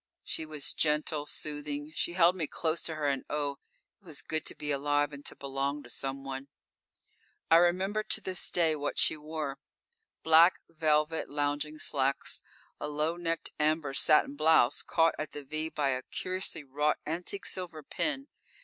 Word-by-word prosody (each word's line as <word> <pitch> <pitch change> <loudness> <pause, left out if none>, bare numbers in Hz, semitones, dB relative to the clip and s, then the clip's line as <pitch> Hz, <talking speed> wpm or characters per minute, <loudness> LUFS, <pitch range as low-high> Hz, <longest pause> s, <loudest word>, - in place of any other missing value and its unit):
She 160 - -3
was 150 -2 -1
gentle 150 -1 0
soothing. 145 0 -4
She 170 - -1
held 175 0 +5
me 165 -5 -2
close 160 +2 -1
to 160 - -3
her 155 -1 -2
and 135 -2 +1
oh! 145 -2 -2 0.4
it - - -35
was 160 -6 -6
good 155 0 -2
to - - -3
be 150 0 -3
alive 145 +1 +1
and 140 0 -9
to - - -6
belong 140 +1 -2
to - - -6
someone._ 135 0 -4 1.0
_I 165 +1 +9
remember 190 +4 +2
to - - 0
this 185 -1 -1
day 165 -3 +3
what 145 -1 -3
she - - +4
wore. 150 -2 -5 0.6
Black 160 +3 +6
velvet 155 0 +1
lounging 145 +1 -1
slacks, 135 -2 0 0.4
a - - -3
low 150 +3 -1
necked 165 -1 -2
amber 150 -2 +1
satin 150 0 +5
blouse, 155 -4 +4
caught 165 0 +3
at 155 -1 -4
the 145 - -6
"V" 155 +3 -3
by 145 -3 0
a 130 -1 0
curiously 185 +1 -4
wrought 150 +2 +1
antique 175 +5 -3
silver 170 -4 -5
pin. 275 - -2
150 Hz, 165 wpm, -30 LUFS, 145-165 Hz, 1.0 s, I